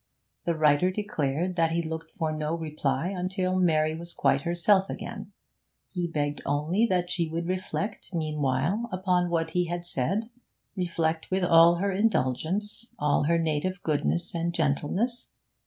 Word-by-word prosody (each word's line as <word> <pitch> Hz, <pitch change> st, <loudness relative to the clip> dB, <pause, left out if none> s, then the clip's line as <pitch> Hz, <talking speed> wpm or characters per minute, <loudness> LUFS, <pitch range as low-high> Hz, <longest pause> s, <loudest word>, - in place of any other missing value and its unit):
The 170 Hz, -, +1 dB
writer 155 Hz, +3 st, +4 dB
declared 180 Hz, -4 st, -1 dB
that 165 Hz, -1 st, +3 dB
he 170 Hz, +1 st, 0 dB
looked 160 Hz, 0 st, -5 dB
for 160 Hz, -2 st, 0 dB
no 155 Hz, +1 st, -2 dB
reply 150 Hz, -1 st, -1 dB
until 185 Hz, 0 st, -1 dB
Mary 155 Hz, -3 st, +2 dB
was 170 Hz, +1 st, -6 dB
quite 135 Hz, -, +2 dB
herself 180 Hz, +4 st, +2 dB
again; -, -, -6 dB, 0.6 s
he 175 Hz, -2 st, -2 dB
begged 145 Hz, -3 st, -2 dB
only 155 Hz, +10 st, +1 dB
that 180 Hz, -3 st, 0 dB
she 170 Hz, -3 st, 0 dB
would 170 Hz, +1 st, -3 dB
reflect, 185 Hz, +3 st, -3 dB
meanwhile, 155 Hz, -, -1 dB
upon 180 Hz, -1 st, +1 dB
what 165 Hz, -1 st, 0 dB
he 180 Hz, 0 st, +1 dB
had 175 Hz, 0 st, -4 dB
said, 195 Hz, -, -1 dB, 0.4 s
reflect 165 Hz, -3 st, -1 dB
with 190 Hz, 0 st, 0 dB
all 170 Hz, 0 st, +7 dB
her 195 Hz, +3 st, 0 dB
indulgence, 205 Hz, -, 0 dB
all 145 Hz, 0 st, +2 dB
her 170 Hz, +2 st, +3 dB
native 165 Hz, +3 st, -1 dB
goodness 165 Hz, +3 st, 0 dB
and 170 Hz, 0 st, -2 dB
gentleness. 170 Hz, -, 0 dB
170 Hz, 150 wpm, -27 LUFS, 155-185 Hz, 0.6 s, all